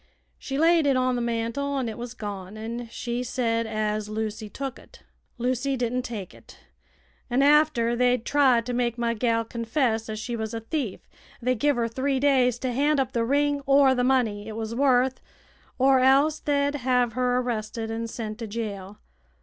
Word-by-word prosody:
She 270 - -4
laid 325 0 +4
it 270 -2 +3
on 255 0 +1
the 240 - -1
mantel 235 +4 -2
an' 260 -3 -1
it 220 - -4
was 240 0 -7
gone, 205 -2 -7
an' 230 +2 -5
she 240 +1 -4
said 230 -2 -1
as 215 -1 -2
Lucy 215 0 -4
took 270 +3 -6
it. - - -18 0.3
Lucy 255 +2 -1
didn't 245 +1 -1
take 215 -7 -6
it, - - -16 0.7
an' 255 +3 +2
after 290 -5 +4
they'd 250 -1 +2
tried 260 -5 +3
to 250 - -3
make 240 -1 0
my 235 -1 0
gal 230 0 0
confess 230 -1 -1
as 215 - -4
she 235 +3 -4
was 220 0 -4
a - - -2
thief 230 - -4 0.3
they 255 +2 +1
give 285 +3 +1
'er 235 -1 +1
three 265 +3 -1
days 260 -4 +3
to 255 0 -2
hand 285 +4 +2
up 260 -1 0
the 235 -2 0
ring 285 +3 +1
or 275 -1 +5
the 250 -1 0
money 230 -5 +1
it 220 - -6
was 225 0 -4
worth, 260 0 +2 0.6
or 265 0 +4
else 275 +4 +4
they'd 285 -1 0
hev 250 -3 +1
her 250 0 +1
arrested 225 -2 -3
and 230 +1 -3
sent 220 -1 -6
t' 230 - -5
jail. 205 -2 -5
245 Hz, 190 wpm, -25 LUFS, 225-265 Hz, 0.7 s, or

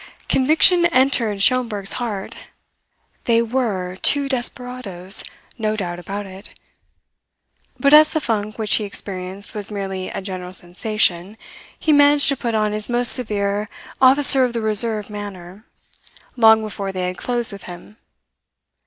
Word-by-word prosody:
Conviction 320 +6 +4
entered 255 -9 +1
Schomberg's 230 -6 +2
heart. 205 -5 -5 0.9
They 230 -1 +2
were 215 -7 -3
two 280 +7 +3
desperadoes 245 -7 -3 0.4
no 215 -1 -1
doubt 175 -4 -5
about 200 +3 -7
it. 190 +2 -13 1.2
But 280 +1 +2
as 305 0 +7
the 315 - -1
funk 215 -5 -3
which 220 -2 0
he 215 - -3
experienced 195 -1 -4
was 205 -2 -1
merely 195 -2 -5
a - - -6
general 185 -2 -8
sensation, 185 +1 -2 0.4
he 310 - +1
managed 290 0 +5
to 275 - +1
put 235 -3 -4
on 215 -1 0
his 210 +2 -3
most 240 0 +2
severe 210 -3 -1 0.3
Officer 265 0 +5
of 245 -2 -1
the 230 - -3
Reserve 215 -1 +2
manner, 205 -1 -10 0.7
long 220 -2 +4
before 200 -2 -5
they 185 -1 -4
had 180 0 -5
closed 240 -2 0
with 200 -1 -11
him. 175 +4 -12
215 Hz, 140 wpm, -19 LUFS, 195-245 Hz, 1.2 s, as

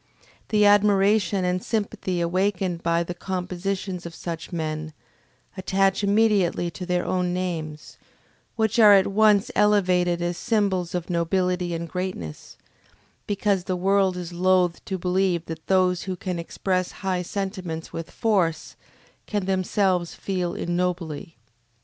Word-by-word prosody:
The 210 -1 +4
admiration 205 -1 +4
and 180 0 -1
sympathy 205 -5 -2
awakened 180 0 0
by 170 0 +1
the 175 - -5
compositions 185 +1 -4
of 165 - -10
such 165 +1 -6
men, 155 -2 -3 0.6
attach 195 +1 +1
immediately 200 -4 +2
to 180 +1 -7
their 180 -1 0
own 180 -1 0
names, 160 -4 -5 0.6
which 220 +1 +1
are 210 -2 +9
at 195 - +5
once 210 0 +3
elevated 180 -4 +3
as 175 0 -2
symbols 190 -6 0
of 175 0 -3
nobility 180 +1 0
and 170 0 -4
greatness, 180 - -6 0.7
because 200 -2 0
the 185 - -1
world 190 0 +2
is 175 -1 -6
loath 180 -1 +2
to 190 - -3
believe 180 -1 0
that 160 -1 -8
those 185 -2 +3
who 190 -1 -3
can 180 -1 -4
express 185 +2 -2
high 185 -2 0
sentiments 185 -3 -5
with 165 0 -5
force, 185 -9 0 0.5
can 205 -3 -1
themselves 185 -2 0
feel 180 -3 -2
ignobly. 175 -3 -3
185 Hz, 130 wpm, -24 LUFS, 175-195 Hz, 0.7 s, are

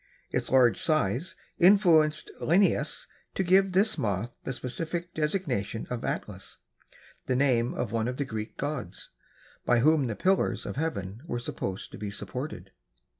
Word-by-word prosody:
Its - - -1
large 125 -3 +4
size 155 - 0 0.2
influenced 170 -5 +5
Linnaeus 190 +5 +2 0.3
to 190 - +1
give 190 +2 +4
this 205 +4 +3
moth 105 +3 -2
the - - -3
specific 165 +7 -4
designation 150 - -2
of 125 - -3
Atlas, - - -5 0.7
the 130 - +1
name 125 -3 +2
of 120 - -2
one 115 0 0
of 125 0 -3
the 140 - -1
Greek 110 -3 -6
gods, 145 +2 -4 0.5
by 120 -1 +3
whom 150 -1 +4
the 110 - -3
pillars 190 - +1
of - - -5
heaven 110 -9 -3
were 120 - -2
supposed 95 -5 -5
to - - -10
be 105 0 -4
supported. 105 +9 -6
135 Hz, 150 wpm, -28 LUFS, 115-170 Hz, 0.7 s, influenced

